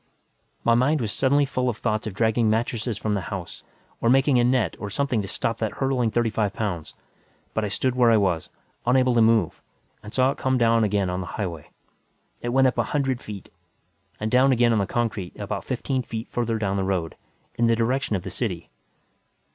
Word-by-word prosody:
My 115 - +4
mind 130 +6 +3
was 110 -5 -2
suddenly 140 +4 +2
full 125 -2 -1
of 110 - -3
thoughts 110 +1 -1
of 100 - -6
dragging 110 +1 +2
mattresses 115 0 -1
from 110 0 -1
the 100 - 0
house, 95 -4 -6 0.4
or 115 - +2
making 135 0 +4
a - - +4
net 125 -1 +2
or 105 - -5
something 125 0 0
to 100 - -6
stop 115 +3 -2
that 110 -2 -2
hurtling 135 -4 0
thirty 115 0 0
five 105 -2 0
pounds; 85 -8 -4 0.6
but 110 - -1
I - - 0
stood 125 +5 0
where 125 -2 +4
I 115 - +5
was, 95 -6 0 0.4
unable 130 0 +4
to 120 - +4
move, 115 -1 +2 0.4
and 105 - -10
saw 130 +2 +3
it - - -8
come 130 0 +1
down 115 -1 +3
again 100 -3 +1
on 90 +1 -2
the 90 - -6
highway. 85 -7 -4 0.7
It 120 - -3
went 135 +2 +4
up 130 - +1
a - - +3
hundred 135 -3 0
feet. 105 -2 -9 0.7
And 110 +1 -2
down 130 +2 +5
again 120 -2 +3
on 110 - +2
the 100 - 0
concrete, 110 -6 -2
about - - -4
fifteen 130 -2 -2
feet 115 -1 -6
further 115 -2 -1
down 100 -2 -1
the 95 - 0
road. 90 -4 -2 0.4
In 120 0 +1
the 115 - +4
direction 120 0 0
of 90 - -3
the - - -6
city. 90 -9 -4
115 Hz, 210 wpm, -24 LUFS, 105-125 Hz, 0.7 s, I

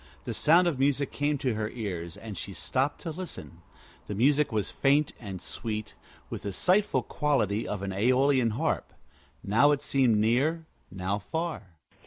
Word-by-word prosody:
The - - -4
sound 170 +4 +5
of 150 -6 -1
music 140 0 +1
came 145 +1 0
to 130 -3 -1
her 105 0 -2
ears, 90 -8 -5
and 110 -3 -8
she 100 - -6
stopped 135 +8 -1
to 165 - -4
listen. 155 - -8 0.5
The 105 - -4
music 140 +6 +3
was 105 -2 -1
faint 140 +1 +2
and 100 -5 -6
sweet, 110 +3 -5 0.3
with - - -6
the 100 - -4
sighful 190 - +2
quality 115 -8 0
of 105 -2 -4
an 100 - -3
Æolian 125 +3 +3
harp. - - -1 0.5
Now 115 +9 +4
it 145 -1 +1
seemed 130 -7 +3
near, 135 +10 +2 0.2
now 95 +2 -2
far. 105 - -4
125 Hz, 165 wpm, -28 LUFS, 105-145 Hz, 0.5 s, sound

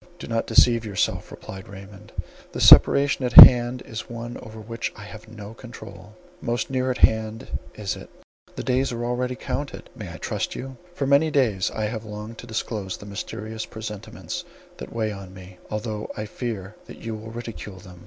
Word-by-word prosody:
"Do - - -8
not 115 -1 -2
deceive 115 -2 +5
yourself," 100 -4 -1
replied 95 0 -10
Raymond, 100 0 -12 0.4
"the - - -4
separation 140 -1 +7
at 125 - -1
hand 125 0 +10
is 110 0 -7
one 120 0 -6
over 110 0 -10
which 115 +2 -4
I 105 - -10
have 110 +1 -11
no 110 -1 -10
control; 110 -4 -12 0.3
most 120 +1 -2
near 130 0 0
at 125 - -1
hand 110 +2 +2 0.3
is 105 -3 -3
it; - - -11 0.5
the - - -5
days 130 +1 +1
are 120 0 -3
already 125 +1 -1
counted. 140 +2 -5
May - - -7
I - - -8
trust - - -3
you? 135 0 -7 0.2
For 140 - -1
many 140 +3 +4
days 115 -11 +1
I 110 - -3
have 110 0 -4
longed 105 +1 -8
to 120 - -9
disclose 110 -4 -4
the - - -12
mysterious 110 +2 -6
presentiments 105 -2 -7 0.3
that 65 - -8
weigh 110 -2 -1
on 95 -2 -9
me, 90 -1 -13
although 105 0 -4
I 105 - -3
fear 105 -3 -5
that - - -10
you 115 -1 -6
will 110 +1 -8
ridicule 115 -4 -7
them. 90 -2 -13
110 Hz, 185 wpm, -24 LUFS, 105-120 Hz, 0.5 s, hand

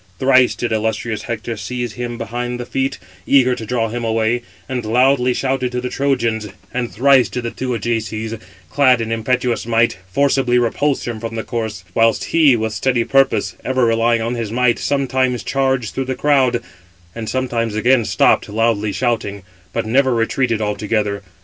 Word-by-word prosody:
Thrice 130 -1 +4
did 120 - -3
illustrious 110 0 -1
Hector 115 0 -4
seize 120 +2 -4
him 120 -1 -5
behind 120 +2 -4
by 120 - -5
the 120 - -16
feet, 135 0 -1 0.3
eager 130 -2 +4
to 115 -3 -6
draw 115 -1 0
him 120 +1 -4
away, 115 +1 +1 0.3
and 130 -2 -3
loudly 125 +3 +3
shouted 130 0 -1
to 125 - -1
the 125 0 -4
Trojans; 115 -6 0 0.3
and 120 -1 -2
thrice 135 +2 +4
did 125 - -4
the 115 - -3
two 130 -1 -3
Ajaces, 110 0 -3 0.3
clad 130 -4 +4
in 115 0 -3
impetuous 120 +1 -1
might, 115 -4 +2
forcibly 135 0 +2
repulse 130 +4 0
him 115 -2 -4
from 115 0 -5
the 110 - -3
corse; 110 -7 -4
whilst 115 +1 +2
he, 155 -6 +4
with 110 -1 -2
steady 125 0 +1
purpose, 135 +2 +2
ever 130 -1 +1
relying 115 0 +2
on 115 +2 -2
his 115 -3 -4
might, 125 0 +2
sometimes 130 -3 0
charged 135 -4 0
through 135 - -2
the 130 0 -3
crowd, 130 -5 +2 0.5
and 115 -2 -5
sometimes 120 -4 -1
again 120 +3 +3
stopped, - - +2
loudly 110 -1 +1
shouting; 110 -5 -2 0.3
but - - -2
never 130 +2 +2
retreated 115 0 0
altogether. 105 -1 -1
120 Hz, 175 wpm, -18 LUFS, 115-130 Hz, 0.5 s, Thrice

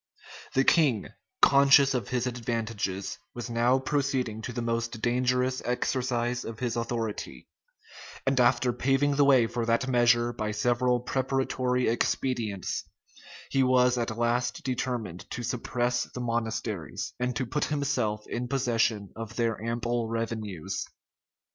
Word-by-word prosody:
The 135 - +5
king, 135 - +3 0.3
conscious 140 0 +6
of 120 -6 -2
his 125 -1 0
advantages, 115 -5 -3 0.2
was 120 0 -5
now 120 +2 +3
proceeding 130 -5 -1
to 125 - -5
the 120 - -4
most 115 0 -2
dangerous 125 +2 +1
exercise 125 0 -1
of 115 -1 -7
his 120 0 -2
authority; 115 - -4 0.8
and 135 -1 +2
after 125 0 +3
paving 135 +3 +2
the 145 - +4
way 135 -4 +5
for 120 +1 -2
that 115 +2 +2
measure 120 -1 +3
by 105 -2 -3
several 120 +3 +1
preparatory 130 -1 0
expedients, 115 -4 -1 0.7
he 135 - +3
was 125 -1 +4
at 115 -1 -2
last 120 +1 0
determined 120 -9 -3
to 120 - -5
suppress 120 0 -1
the - - -4
monasteries, 115 - -3
and 125 0 -1
to 130 - -1
put 135 +5 -1
himself 125 -8 -1
in 120 +1 -3
possession 115 -6 0
of 115 -1 -7
their 115 -3 -1
ample 120 0 -1
revenues. 110 -7 -3
120 Hz, 135 wpm, -28 LUFS, 115-130 Hz, 0.8 s, conscious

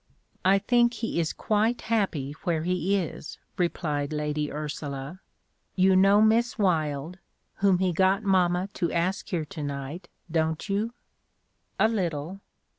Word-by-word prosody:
"I 190 +1 +5
think 240 +4 +2
he 225 -6 -2
is 165 -2 0
quite 220 +3 0
happy 195 -11 0
where 165 -3 0
he 180 +2 +1
is," 170 -4 -5 0.2
replied 155 -5 -1
Lady 150 0 -2
Ursula. 145 +1 -5 0.6
"You 190 0 +4
know 195 +3 +6
Miss 230 +3 +3
Wylde, 160 -3 0 0.4
whom 195 -2 +3
he 185 -1 +1
got 190 +4 +2
mamma 185 -2 +2
to 170 -3 -1
ask 175 +3 -1
here 165 -4 -1
to 150 +1 -8
night, 145 +4 -5 0.2
don't 160 +1 0
you?" 215 +4 -1 0.8
"A 220 - +5
little. 180 -4 -3
180 Hz, 135 wpm, -27 LUFS, 155-200 Hz, 0.8 s, know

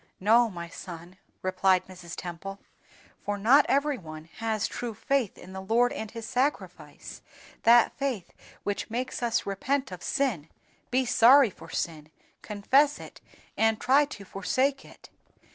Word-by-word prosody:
"No, 230 +4 +4
my 170 -3 -7
son," 175 +1 -10 0.2
replied 185 0 +2
Mrs. 180 -3 -10
Temple, 180 +3 -7 0.6
"for 205 0 -3
not 250 +8 +5
every 280 -1 +1
one 155 -2 -10
has 220 -2 -1
true 235 -3 -5
faith 270 -2 -1
in 185 - -12
the 190 - -6
Lord 230 +5 +2
and 220 - -5
His 230 0 -8
Sacrifice, 260 +5 -3 0.4
that 235 0 +5
faith 255 -10 -3 0.3
which 205 +2 -3
makes 250 +3 -3
us 235 -1 0
repent 260 +6 -1
of 180 -1 -8
sin, 200 - -1 0.4
be 255 +1 +1
sorry 245 0 +6
for - - -14
sin, 155 -2 -4 0.3
confess 270 +8 +2
it - - -12 0.3
and 225 -1 +2
try 275 +3 +4
to 205 -8 -10
forsake 260 +9 -1
it. - - -16
220 Hz, 145 wpm, -27 LUFS, 185-255 Hz, 0.6 s, sorry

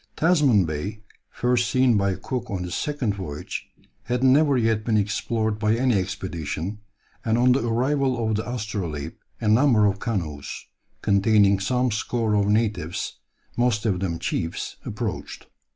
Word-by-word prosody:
Tasman 145 - +4
Bay, 95 +8 -4 0.3
first 120 -1 +1
seen 130 -2 +3
by 100 -2 +1
Cook 125 +2 -4
on 95 -3 -3
his 90 - -5
second 145 -8 -1
voyage, 90 -7 -6 0.4
had 125 +1 -1
never 140 +1 +5
yet 110 -2 +1
been 110 -1 +1
explored 105 +1 -1
by 105 +1 +2
any 125 +1 +2
expedition, 95 -1 -3 0.4
and 115 -1 +1
on 125 +1 +4
the 125 -1 +2
arrival 130 0 +1
of 110 - +1
the 110 +3 -3
Astrolabe 100 - -4 0.3
a 110 - -2
number 110 -1 +5
of 100 0 +1
canoes, 85 - -4 0.4
containing 100 0 +4
some 125 +5 +1
score 110 +1 -1
of 100 -1 +2
natives, 105 -6 -1 0.4
most 120 -3 +1
of 95 -5 +1
them 90 -3 -2
chiefs, 80 0 -3
approached. - - -5
110 Hz, 150 wpm, -24 LUFS, 100-125 Hz, 0.4 s, never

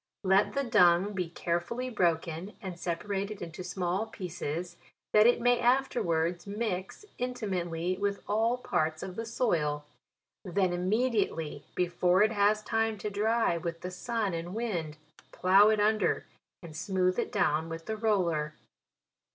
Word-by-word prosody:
Let 195 +1 +3
the 280 - +1
dung 200 -4 +4
be 180 -4 -2
carefully 175 +10 -2
broken 170 -1 -1
and 190 -2 -5
sepa 170 +2 -4
rated 200 +1 -2
into 170 +1 -7
small 180 +3 -2
pieces, 175 -4 -5 0.4
that 215 +1 +7
it 245 - +4
may 245 0 +3
afterwards 175 -10 +1
mix 200 - -3
intimately 185 -8 -2
with 200 0 -1
all 225 +4 +2
parts 160 -9 -1
of 185 - -6
the 225 +2 -4
soil; 155 -11 0 0.6
then 185 -1 0
immediately, 185 - 0
before 180 +2 +3
it 215 - +3
has 210 0 +2
time 225 0 0
to 210 +1 -4
dry 220 -2 +1
with 170 0 -5
the 180 - -5
sun 215 +1 -2
and 170 +3 -4
wind, 175 -10 -3 0.3
plough 195 +3 +5
it 215 -1 +2
under, 215 -1 +2 0.4
and 160 -3 -10
smooth 185 +2 0
it - - -2
down 155 +2 +1
with 165 0 -6
the 220 - -3
roller. 175 -9 0
190 Hz, 145 wpm, -30 LUFS, 170-215 Hz, 0.6 s, that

